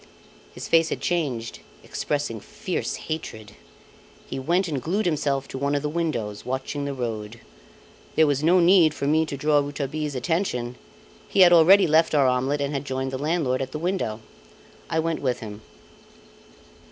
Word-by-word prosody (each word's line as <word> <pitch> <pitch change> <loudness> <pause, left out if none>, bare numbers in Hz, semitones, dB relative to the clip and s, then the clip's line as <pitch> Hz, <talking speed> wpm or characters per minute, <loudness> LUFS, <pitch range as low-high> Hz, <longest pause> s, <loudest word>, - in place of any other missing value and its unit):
His - - -8
face 165 -1 +4
had - - -3
changed, 135 -10 -2 0.2
expressing - - -3
fierce - - -4
hatred. 110 -9 -6 0.7
He - - -5
went 175 +7 +1
and 145 -5 -3
glued 195 - -1
himself 140 -5 0
to 130 - -6
one 140 +1 0
of 145 - -1
the 150 - -1
windows, 125 -11 -3
watching 130 +3 -3
the 140 - -3
road. 115 -2 -5 0.8
There 160 - +5
was 145 -1 0
no 175 +3 +5
need 170 -3 +5
for - - -3
me 155 +2 +2
to 140 - -5
draw 150 +1 +3
Rouletabille's 145 +1 -3
attention; 125 -4 -1 0.5
he 195 - +3
had 175 -1 +8
already 180 +4 +7
left 160 0 +3
our 140 -2 +4
omelette 130 +3 +1
and 140 +1 -2
had 140 -1 -2
joined 130 -1 -3
the 130 - -4
landlord 145 -4 0
at 130 0 -5
the - - -2
window. 160 - -2 0.7
I - - -1
went 160 0 -1
with 130 -3 -1
him. 105 -1 -8
145 Hz, 170 wpm, -24 LUFS, 130-160 Hz, 0.8 s, had